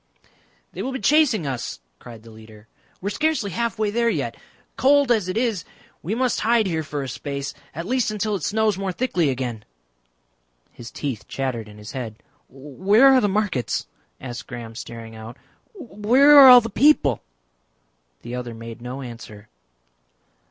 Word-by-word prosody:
"They - - -6
will 265 - -4
be 265 - -4
chasing 255 - +3
us," 125 - -4 0.2
cried 115 -3 -12
the 115 - -14
leader. 110 0 -15 0.3
"We 195 - -2
are - - -5
scarcely 255 -5 -1
halfway 215 +1 -1
there 235 +2 +1
yet. - - -2 0.4
Cold 280 -1 +3
as 215 -6 +2
it 185 - -2
is 225 -7 0 0.4
we 200 +6 -3
must 250 -1 0
hide 230 0 +2
here 165 -4 -1
for 145 -2 -5
a - - -5
space 140 +2 -5 0.2
at 165 +2 -5
least 250 +3 0
until 215 0 -2
it 190 - -4
snows 215 +2 0
more 195 -1 -2
thickly 180 - 0
again." 125 -4 -4 1.1
His 120 0 -11
teeth 130 -7 -5
chattered 125 -5 -4
in 105 - -14
his 105 0 -10
head. 120 -5 -6 0.3
"Where 190 - +3
are 260 - +5
the 205 - +1
markets?" 190 - -1 0.3
asked 120 -2 -8
Graham 120 -3 -8
staring 115 0 -9
out. 110 +2 -10 0.4
"Where 250 - +4
are 270 - +10
all 250 -1 +10
the 230 0 -6
people?" 205 - +3 1.0
The 120 - -7
other 125 -2 -5
made 115 0 -10
no 125 +3 -6
answer. 115 -4 -11
175 Hz, 165 wpm, -22 LUFS, -, 1.1 s, are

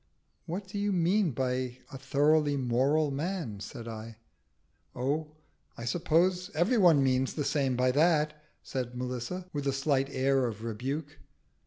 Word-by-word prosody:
"What 190 +4 -4
do 205 +2 -5
you 205 0 0
mean 185 +2 +2
by 130 -1 -2
a 135 - -6
thoroughly 145 +2 +2
moral 135 +4 +2
man?" 145 - -3
said 115 +3 -8
I. 110 0 -7 0.8
"Oh, 145 +5 -1 0.5
I 115 - -6
suppose 180 - +1
every 210 +9 +3
one 165 -7 +6
means 130 0 +1
the 150 - -1
same 135 -4 +1
by 125 +1 +3
that," 150 +1 +3 0.3
said 125 -2 -4
Melissa, 125 +9 -4
with 145 -1 -2
a - - +3
slight 135 0 +1
air 135 -1 +2
of 110 -1 -6
rebuke. 135 +7 -4
140 Hz, 150 wpm, -30 LUFS, 125-165 Hz, 0.8 s, one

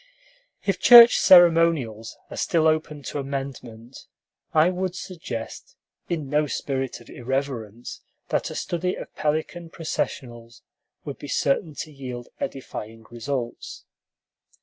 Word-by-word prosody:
If - - 0
church 240 -1 +9
ceremonials 165 - +4
are - - -6
still 165 -2 +1
open 155 -2 0
to 145 - -4
amendment, 135 -3 -7 0.4
I 160 +3 +4
would 185 0 -3
suggest, 165 -12 -7 0.3
in 155 -5 -3
no 150 +2 +1
spirit 135 -3 -3
of 120 - -17
irreverence, 125 -3 -4 0.3
that - - -1
a - - -8
study 180 +1 -2
of - - -9
pelican 160 +3 -2
processionals 120 -8 -5 0.4
would - - -7
be - - -8
certain 150 +3 0
to 155 - -8
yield 125 -4 -8
edifying 115 -4 -6
results. 120 +1 -5
140 Hz, 120 wpm, -24 LUFS, 120-165 Hz, 0.4 s, church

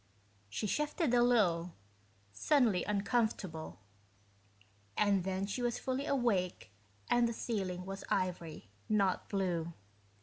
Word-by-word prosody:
She 105 - -3
shifted 300 - 0
a 240 - +5
little, 180 -9 +3 0.6
suddenly 220 - +3
uncomfortable... 200 - -1 1.2
and 200 -3 +3
then 190 +1 -1
she 205 +5 -3
was 240 -1 0
fully 265 +3 -2
awake 200 - 0 0.4
and 240 -1 +4
the 235 - -2
ceiling 190 -6 -3
was 195 +1 -6
ivory, 175 - -2 0.2
not 200 -3 +1
blue. 175 -4 -1
195 Hz, 110 wpm, -34 LUFS, 180-240 Hz, 1.2 s, a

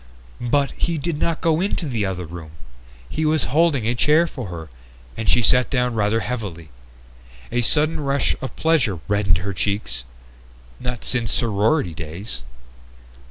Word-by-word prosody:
But 140 +2 +3
he 170 -1 -1
did 150 +1 -2
not 165 -1 0
go 165 0 +2
into 190 -3 -1
the 115 -7 0
other 90 -2 -3
room! 80 -1 -9 0.5
He 155 - -2
was 155 -2 +2
holding 155 -7 +3
a 120 - +2
chair 150 +7 +4
for 130 -9 -6
her, 80 -3 -7 0.4
and 115 - -1
she 120 - +4
sat 125 +2 +4
down 125 -2 +1
rather 110 +1 +1
heavily. 100 -11 -5 0.8
A 120 +1 +1
sudden 155 +6 +2
rush 140 -1 +1
of 130 - -5
pleasure 130 - +2
reddened 100 -3 +3
her 95 +3 -3
cheeks. 90 - -1 0.8
_Not 125 -2 -3
since 120 -3 0
sorority 110 - +2
days 80 -2 -6
120 Hz, 155 wpm, -22 LUFS, 100-150 Hz, 0.8 s, chair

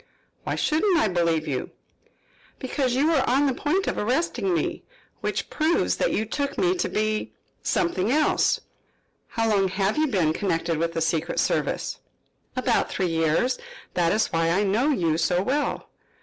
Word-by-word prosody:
"Why - - -1
shouldn't 335 +4 +2
I 220 - +2
believe 165 -3 +1
you?" 130 -3 -2 0.9
"Because 260 -1 -1
you 275 +3 +2
were 285 -5 +3
on 270 +4 +3
the 270 - +2
point 305 +9 0
of - - -2
arresting 325 - 0
me, 345 - -1 0.4
which - - -3
proves 315 +2 +1
that - - +1
you 220 - 0
took 280 +5 -3
me 365 -1 +3
to - - -1
be 215 0 -1 0.3
something 295 - 0
else." 305 +2 +2 0.7
"How 225 -1 -1
long 200 -3 +3
have 195 +7 0
you 310 - +3
been 180 - +1
connected 165 -4 -1
with 165 0 -1
the 165 - -2
secret 165 +1 0
service?" - - -1 0.6
"About - - +1
three 185 -3 -1
years. 165 +10 +1 0.3
That 170 -2 +2
is 215 - +1
why 165 0 +2
I 185 +5 +2
know 215 +9 +2
you 165 - +1
so 175 +2 +1
well." 285 +7 -1
215 Hz, 165 wpm, -25 LUFS, -, 0.9 s, were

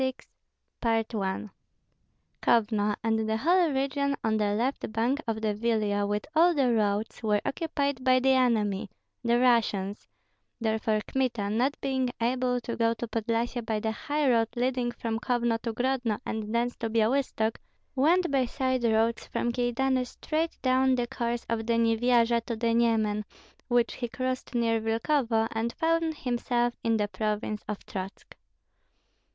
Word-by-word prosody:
CHAPTER 260 -1 -2 0.9
XXVI. 195 0 -2 0.9
Kovno, 210 -2 +2
and 220 -1 0
the 220 - +1
whole 345 +6 +3
region 280 +1 0
on 220 -1 +1
the 205 -1 +1
left 245 +1 -1
bank 240 +6 0
of 220 -1 -2
the 215 -1 0
Vilia, 210 -2 0
with 205 0 -2
all 340 +2 +5
the 260 -4 +3
roads, 210 0 0
were 210 -2 +2
occupied 285 -4 -2
by 255 0 +5
the 265 +1 +3
enemy 215 -6 +1 0.3
(the 235 0 +3
Russians); 220 -5 +1 0.5
therefore 220 -1 0
Kmita, 235 -6 -1
not 255 +6 0
being 260 -2 0
able 250 +1 +1
to 235 0 -4
go 230 0 +1
to 240 - -5
Podlyasye 230 +2 -1
by 220 -1 -1
the 220 +1 -1
high 290 +6 -1
road 230 -3 +3
leading 245 0 0
from 230 -2 -3
Kovno 235 -2 0
to 230 - -2
Grodno 245 -2 -1
and 215 -1 -4
thence 240 +1 0
to 230 - -3
Byalystok, 225 0 +1 0.4
went 335 +5 +3
by 270 -2 +2
side 260 0 -1
roads 225 0 +1
from 240 - -1
Kyedani 250 +1 0
straight 320 +5 -3
down 260 0 +3
the 245 -1 0
course 235 0 -3
of 225 -1 -2
the 235 - +2
Nyevyaja 230 0 +3
to 235 - -2
the 230 +1 0
Nyemen, 220 -3 +2 0.4
which 240 -1 +2
he 240 - -4
crossed 255 +1 -4
near 230 -1 +2
Vilkovo, 225 0 +1
and 225 +1 -1
found 330 -1 0
himself 240 -1 0
in 225 -1 +2
the 210 -1 0
province 210 0 -3
of 210 -1 -5
Trotsk. 190 0 -7
235 Hz, 155 wpm, -28 LUFS, 220-255 Hz, 0.9 s, all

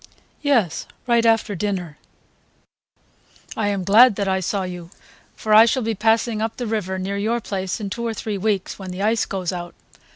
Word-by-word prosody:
"Yes; 250 - +1 0.2
right 235 -1 +3
after 225 -2 +2
dinner." 180 -5 -3 1.6
"I 215 - -1
am 200 -2 -1
glad 215 +4 +6
that 200 -1 -2
I 190 0 +1
saw 190 +1 -2
you, 180 -2 -7 0.5
for 215 - -1
I 220 +2 +9
shall 255 +2 +1
be 225 0 -1
passing 220 +1 +1
up 225 0 -3
the 245 - -3
river 210 -4 -2
near 195 +2 -3
your 225 +4 0
place 190 -2 -4
in 200 -2 -5
two 235 +2 -3
or 225 - -2
three 210 -2 -4
weeks, 200 -2 -1
when 190 -1 -7
the 180 +2 -4
ice 220 +2 +2
goes 185 -2 -3
out. 175 -1 -6
205 Hz, 190 wpm, -22 LUFS, 190-225 Hz, 1.6 s, I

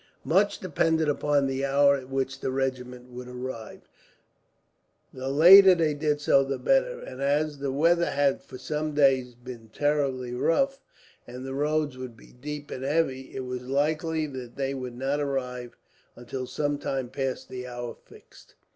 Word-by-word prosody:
Much 200 +4 +2
depended 160 -2 +1
upon 145 -1 +1
the 135 0 -2
hour 140 +1 +4
at 130 -1 -7
which 135 0 -2
the 135 - -2
regiment 125 -1 -3
would 125 0 -8
arrive. 125 -3 -7 1.3
The 130 0 -6
later 185 +6 +9
they 160 -3 +1
did 150 0 0
so 140 -2 +4
the 135 0 -3
better, - - +1
and 130 +1 -9
as 145 +1 0
the 140 -1 -2
weather 170 +5 +3
had 140 -1 +1
for - - -11
some 150 +2 -3
days 130 -4 +3
been 120 -2 -11
terribly 135 -2 -1
rough, 270 - +1 0.5
and 125 +2 -8
the 135 - -5
roads 150 -1 -1
would 125 -3 -8
be - - -17
deep 145 +3 -7
and 130 - -5
heavy, 135 -2 -1
it 130 - -3
was 125 0 -4
likely 155 +5 0
that 130 -4 -8
they 135 0 -2
would 125 -2 -6
not 135 +3 -1
arrive 125 -4 -3 0.4
until 125 +2 -6
some 145 +1 -2
time 135 -3 -3
past 135 0 -4
the 125 0 -7
hour 120 -1 -6
fixed. - - -18
135 Hz, 165 wpm, -27 LUFS, 130-150 Hz, 1.3 s, later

